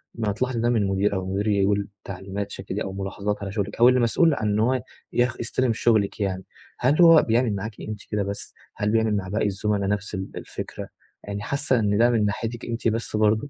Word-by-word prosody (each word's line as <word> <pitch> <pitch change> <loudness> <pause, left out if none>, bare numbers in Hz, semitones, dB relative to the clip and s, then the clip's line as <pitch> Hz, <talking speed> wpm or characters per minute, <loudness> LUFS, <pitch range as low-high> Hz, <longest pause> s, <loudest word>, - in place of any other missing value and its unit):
ما 110 -3 -1
هتلاحظي 125 +3 -1
ده 120 +1 +2
من 110 -5 +2
مدير 95 +1 +1
أو 95 - -2
المدير 95 +3 -2
يقول 100 0 +2 0.2
تعليمات 95 +1 -5
ش - - -6
كده 100 +1 -4
أو 95 - -5
ملاحظات 100 +1 -3
على 100 -1 -4
شغلِك 100 -1 -2
أو 120 +2 +8
اللي 130 0 +3
مسؤول 150 +8 +3
عن 110 -6 -1
إن 105 - +1
هو 125 +2 +2 0.3
يخ 120 0 +2
يستلم 120 +1 0
شغلِك 110 -3 +1
يعني، 95 -2 -2 0.4
هل 140 +7 +3
هو 165 -2 +8
بيعمل 115 -1 +1
معاكِ 105 +2 -5
أنتِ 105 -1 -5
كده 105 -1 0
بس، 100 +1 -6 0.2
هل 105 0 0
بيعمل 110 -1 +2
مع 95 -2 -2
باقي 105 +3 0
الزملاء 100 0 -1
نَفس 105 0 -2
ال 95 0 -4
الفكرة، - - -7 0.4
يعني 100 0 -5
حاسة 135 +2 0
إن 105 -2 +1
ده 120 +2 +5
من 115 -3 +2
ناحيتِك 115 +3 -3
أنتِ 115 0 -2
بس 115 0 -1
برضو؟ 110 +5 +2
105 Hz, 220 wpm, -24 LUFS, 100-115 Hz, 0.4 s, أو